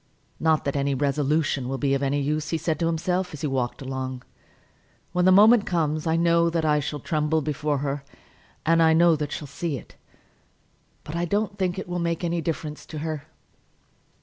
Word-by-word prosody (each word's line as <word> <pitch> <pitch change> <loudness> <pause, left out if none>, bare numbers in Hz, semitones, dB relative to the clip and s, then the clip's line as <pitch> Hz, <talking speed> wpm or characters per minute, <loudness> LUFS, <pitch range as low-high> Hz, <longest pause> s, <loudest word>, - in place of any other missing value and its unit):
"Not 160 -1 +2
that 140 - -1
any 140 0 +1
resolution 145 -1 0
will 135 - -2
be 135 0 +1
of 135 - 0
any 140 +1 +1
use," 150 +2 -1
he 165 - 0
said 160 0 -2
to 165 - +1
himself, 180 +1 -1
as 145 - -10
he - - -1
walked 130 0 -2
along. 130 -1 -4 0.9
"When 180 0 +1
the 185 - +6
moment 215 +3 +6
comes 155 -3 0
I 160 - +2
know 170 0 +3
that 165 -1 -1
I 150 -1 +3
shall 145 +1 -4
tremble 155 +2 0
before 150 0 -1
her, 140 0 -2 0.6
and 165 +1 +4
I 160 0 +5
know 170 0 +5
that 150 -1 -3
she'll 150 - -4
see 145 +1 -3
it; - - -14 1.1
but 150 - -7
I 170 +1 0
don't 205 +3 -1
think 185 -1 0
it 190 - -5
will 175 0 -3
make 170 0 -1
any 170 0 0
difference 155 -1 -4
in 155 - -5
her." 155 -1 -4
155 Hz, 200 wpm, -25 LUFS, 145-170 Hz, 1.1 s, the